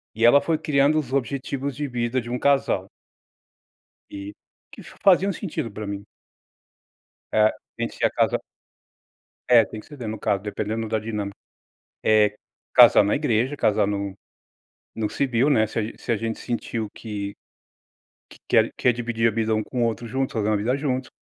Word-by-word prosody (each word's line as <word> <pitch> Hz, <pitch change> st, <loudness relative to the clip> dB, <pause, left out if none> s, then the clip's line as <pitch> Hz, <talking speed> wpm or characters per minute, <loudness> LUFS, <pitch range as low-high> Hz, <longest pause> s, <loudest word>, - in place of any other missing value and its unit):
e 115 Hz, -, -2 dB
ela 130 Hz, +4 st, +7 dB
foi 160 Hz, -2 st, 0 dB
criando 145 Hz, +1 st, +2 dB
os 130 Hz, -4 st, -5 dB
objetivos 140 Hz, +1 st, -2 dB
de 145 Hz, +2 st, -3 dB
vida 120 Hz, 0 st, -1 dB
de 120 Hz, -, -9 dB
um 125 Hz, -, -1 dB
casal 140 Hz, -1 st, +2 dB, 1.3 s
e, 100 Hz, +1 st, -7 dB, 0.4 s
que -, -, -11 dB
faziam 195 Hz, +1 st, +2 dB
sentido 160 Hz, -, -4 dB
para 105 Hz, +1 st, -7 dB
mim. 100 Hz, 0 st, -5 dB, 1.3 s
É, 110 Hz, 0 st, +4 dB, 0.3 s
gente -, -, -3 dB
se -, -, -9 dB
ia -, -, +4 dB
casa -, -, +1 dB, 1.1 s
É, 120 Hz, -2 st, +8 dB
tem 105 Hz, +2 st, -8 dB
que -, -, -18 dB
ceder, 140 Hz, -7 st, -8 dB
no 110 Hz, 0 st, -4 dB
caso, 100 Hz, -1 st, 0 dB
dependendo 110 Hz, +2 st, -3 dB
da 110 Hz, -, 0 dB
dinâmica. 105 Hz, -2 st, -4 dB, 0.7 s
Eh, 105 Hz, -1 st, +4 dB, 0.4 s
casar -, -, +8 dB
na 100 Hz, -, +1 dB
igreja, 130 Hz, -1 st, 0 dB
casar 105 Hz, -4 st, +2 dB
no 100 Hz, -1 st, -3 dB, 0.8 s
no 110 Hz, -1 st, -1 dB
civil, 130 Hz, +1 st, +1 dB
né. 110 Hz, -7 st, +4 dB
Se 110 Hz, -, -5 dB
a -, -, +1 dB, 0.2 s
se 120 Hz, -, -2 dB
a 115 Hz, -, +2 dB
gente 115 Hz, +1 st, -3 dB
sentiu 115 Hz, -2 st, -3 dB
que 100 Hz, -3 st, -5 dB, 1.0 s
que -, -, -15 dB
quer -, -, +4 dB
quer 125 Hz, -, +3 dB
dividir 115 Hz, -1 st, 0 dB
a -, -, -3 dB
vida 110 Hz, 0 st, +1 dB
um 110 Hz, -, 0 dB
com 125 Hz, -2 st, -2 dB
o -, -, +3 dB
outro 115 Hz, 0 st, -2 dB
junto, 130 Hz, +3 st, -2 dB
fazer 110 Hz, -2 st, 0 dB
uma 105 Hz, -, +2 dB
vida 115 Hz, +6 st, 0 dB
junto. 130 Hz, -3 st, -2 dB
115 Hz, 175 wpm, -24 LUFS, 105-130 Hz, 1.3 s, É